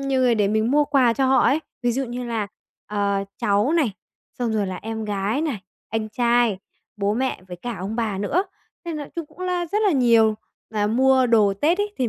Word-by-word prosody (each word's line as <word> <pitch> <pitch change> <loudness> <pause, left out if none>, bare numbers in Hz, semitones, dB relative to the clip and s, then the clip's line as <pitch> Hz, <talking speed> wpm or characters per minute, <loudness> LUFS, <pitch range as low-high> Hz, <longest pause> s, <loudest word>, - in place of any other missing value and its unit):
nhiều 275 -1 0
người 250 -2 +4
để 205 -3 +2
mình 220 +2 +1
mua 295 +2 +4
quà 265 -5 +3
cho 270 +2 +1
họ 265 +1 +4
ấy, 285 - +3 0.2
ví 240 - +2
dụ 270 +3 -1
như 245 0 -5
là, 225 -4 -2 0.4
ờ, 200 -1 0
cháu 205 +8 +2
này, 305 -10 +2 0.5
xong 240 -2 -1
rồi 210 -2 0
là 185 -1 -4
em 220 +2 -5
gái 205 +5 -1
này, 290 -10 -2 0.3
anh 220 -1 -2
trai, 235 -2 +2 0.4
bố 205 0 0
mẹ 260 -4 -2
với 180 - -7
cả 235 +5 -5
ông 200 +5 -4
bà 220 -4 -1
nữa, 285 - 0 0.4
nên 335 -2 -4
nói 290 -2 -6
chung 335 -2 -3
cũng 335 - -23
là 360 -1 -1
rất 410 +6 -1
là - - +4
nhiều. 230 -5 +4 0.4
Mà 210 -1 0
mua 260 +3 +4
đồ 215 -4 +4
Tết 320 - +1
ấy 410 0 -1
thì 250 -2 +1
235 Hz, 225 wpm, -23 LUFS, 210-270 Hz, 0.5 s, người